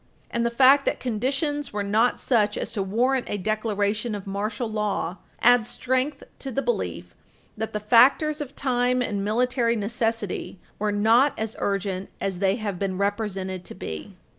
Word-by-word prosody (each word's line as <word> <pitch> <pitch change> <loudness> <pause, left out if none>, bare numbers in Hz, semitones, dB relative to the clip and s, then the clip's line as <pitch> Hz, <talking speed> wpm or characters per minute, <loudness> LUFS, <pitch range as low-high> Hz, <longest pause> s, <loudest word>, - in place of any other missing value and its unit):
And 235 - 0
the 235 - +2
fact 270 +4 +5
that - - +1
conditions 270 +5 -1
were 205 -1 -2
not 220 +5 +2
such 215 -4 +2
as - - -3
to 215 - -2
warrant 240 +7 +1
a 205 - -1
declaration 215 +1 -1
of 200 - -7
martial 210 +4 -3
law 210 -4 -2 0.3
adds 245 -1 +5
strength 260 +4 -1 0.2
to 270 - -5
the 270 +2 -2
belief 485 - -2 0.4
that 220 +1 -4
the 210 - -2
factors 265 +8 +4
of 280 -2 -7
time 250 -1 +1
and 205 -4 -2
military 235 +2 +1
necessity 225 -2 -2 0.2
were 210 0 0
not 225 +7 +4
as 220 0 -3
urgent 195 -1 -2
as 190 -2 -3
they 195 0 +2
have 205 -5 -4
been 190 -2 -2
represented 195 -2 -2
to - - -8
be. 80 -1 -7
220 Hz, 165 wpm, -25 LUFS, 205-250 Hz, 0.4 s, fact